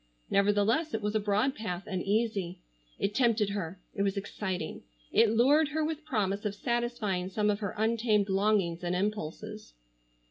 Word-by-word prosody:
Nevertheless 205 +9 +2
it 220 - -2
was 210 0 0
a 215 - +2
broad 210 +6 +1
path, 190 -6 -4
and 190 -3 -3
easy. 200 -3 0 0.4
It 200 - -1
tempted 225 -3 +2
her. 185 -2 -4
It 200 - -3
was 200 0 +1
exciting. 190 -4 -4 0.3
It 230 - +5
lured 275 +8 +4
her 310 +1 -1
with 315 -1 -4
promise 205 -8 -1
of 205 -1 -2
satisfying 235 -6 -1
some 210 +2 +1
of 205 - -2
her 205 -3 -4
untamed 220 -2 +2
longings 195 -3 +1
and 175 +1 0
impulses. 180 - -4
210 Hz, 165 wpm, -30 LUFS, 195-230 Hz, 0.4 s, It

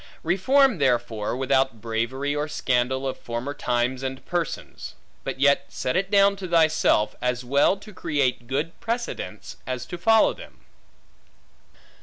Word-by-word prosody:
Reform 230 - +3
therefore, 120 -4 0
without 135 -3 +1
bravery, 120 +6 -2
or 150 +1 -1
scandal 130 -1 0
of 130 - -4
former 120 +4 -4
times 125 -1 -1
and 130 0 -5
persons; 175 -3 -4 0.3
but - - -5
yet 140 0 +4
set 125 - -3
it 190 +1 0
down 200 0 +5
to 190 -1 -6
thyself, 160 -10 +3
as 125 0 -1
well 140 +9 +3
to 210 +2 -13
create 140 -9 -1
good 145 +6 -3
precedents, 235 +1 -4
as 130 -1 -3
to 175 - -7
follow 225 +4 +4
them. - - -14
140 Hz, 140 wpm, -24 LUFS, 125-175 Hz, 0.3 s, down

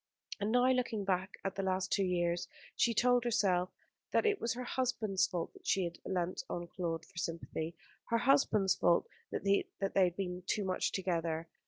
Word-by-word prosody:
And 205 +2 0
now, 245 +1 +4
looking 240 -5 0
back 190 0 -1
at 195 - -1
the 195 - -2
last 190 -1 -1
two 200 - +3
years, 175 -2 0 0.3
she 235 - +3
told 245 +2 +4
herself 190 -6 +2 0.4
that - - +2
it 415 -2 +2
was 230 0 0
her 250 - -4
husband's 235 -6 0
fault 175 -3 -3
that - - -15
she 190 - +3
had 170 -1 -4
leant 180 -1 -2
on 175 - -3
Claude 170 -2 -3
for 170 - -9
sympathy, 165 -1 -4 0.3
her 230 - +3
husband's 230 -6 +4
fault 170 - +3 0.2
that - - -4
they 200 0 +3 0.4
had 175 -1 +1
been 180 -2 -3
too 205 - 0
much 185 -1 0
together. 165 -3 -1
190 Hz, 185 wpm, -34 LUFS, 175-225 Hz, 0.4 s, now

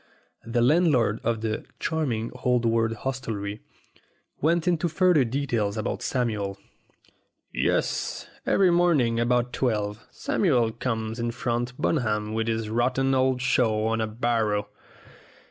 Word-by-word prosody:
The 120 0 +1
landlord 130 - +3
of 115 -2 0
the 110 -1 -2 0.2
"charming 125 -9 -1
old 125 -1 +2
world 115 0 +2
hostelry" 110 -5 -4 0.8
went 165 +3 +2
into 170 -1 +1
further 175 -3 +4
detail 120 -4 -1
about 110 - -2
Samuel. 105 -6 -1 1.0
"Yes, - - -1 0.2
every 190 -2 +3
morning 155 -10 +3
about 125 +1 +1
twelve 105 -3 -1
Samuel 125 - +1
comes 115 -1 -3
in 120 0 -1
from 120 +1 -1
Bunham 110 -7 0
with 110 0 -1
his 115 -1 -1
rotten 125 +4 +1
old 130 -1 +2
show 110 -5 +2
on 115 0 0
a 110 - 0
barrow. 110 -2 0
120 Hz, 125 wpm, -26 LUFS, 110-130 Hz, 1.0 s, further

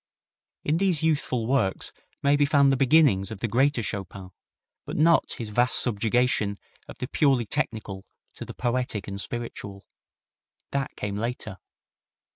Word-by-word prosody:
In 155 +2 +1
these 180 -4 +1
youthful 145 -7 0
works 120 -6 0 0.3
may 140 +1 +4
be 145 - +3
found 140 -2 +4
the - - +3
beginnings 130 -7 +4
of 110 -3 -7
the 115 - -1
greater 130 +2 +2
Chopin, 95 -2 -6 0.5
but - - -6
not 165 +2 +3
his 115 -3 -6
vast 120 +4 +2
subjugation 110 -2 +1 0.3
of - - -11
the 125 - -4
purely 135 -6 +2
technical 105 -3 -2 0.3
to - - -8
the - - -9
poetic 125 -3 -2
and 100 0 -5
spiritual. 100 -4 -7 0.9
That 140 -1 -2
came 100 -1 -4
later. 110 -3 -4
120 Hz, 145 wpm, -26 LUFS, 105-140 Hz, 0.9 s, may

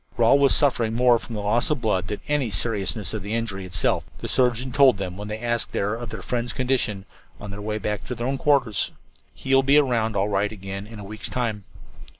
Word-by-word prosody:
"Rawle 120 +4 +5
was 140 -1 +5
suffering 120 -6 +2
more 120 -1 +4
from 115 - -8
loss 105 +3 +1
of 150 -3 0
blood 100 -5 0
than 105 - -3
from - - -23
any 140 -5 +1
seriousness 105 +1 -2
of 110 - -3
the 105 +3 -3
injury 100 -5 -3
itself," 90 +1 +1
the - - -6
surgeon 125 0 +1
told 130 -4 +5
them 90 -2 -4
when 105 +2 -7
they 105 0 -4
asked 120 +1 -1
there 100 +2 0
of 115 0 -5
their 110 -3 -7
friend's 120 -1 -2
condition, 125 -6 0 0.3
on 105 - -7
their 100 +1 -7
way 105 +1 -2
to 105 +4 -3
their 120 +1 -4
own 135 +1 -1
quarters. 135 -8 +2 0.5
"He 135 +10 -2
will 135 - +7
be 135 +2 +4
around 115 -6 +2
all 100 +1 +1
right 100 0 0
again 100 -1 -7
in 115 0 -10
a 100 - -8
week's 105 +2 -6
time." 110 -5 -2
110 Hz, 225 wpm, -24 LUFS, 105-125 Hz, 0.5 s, will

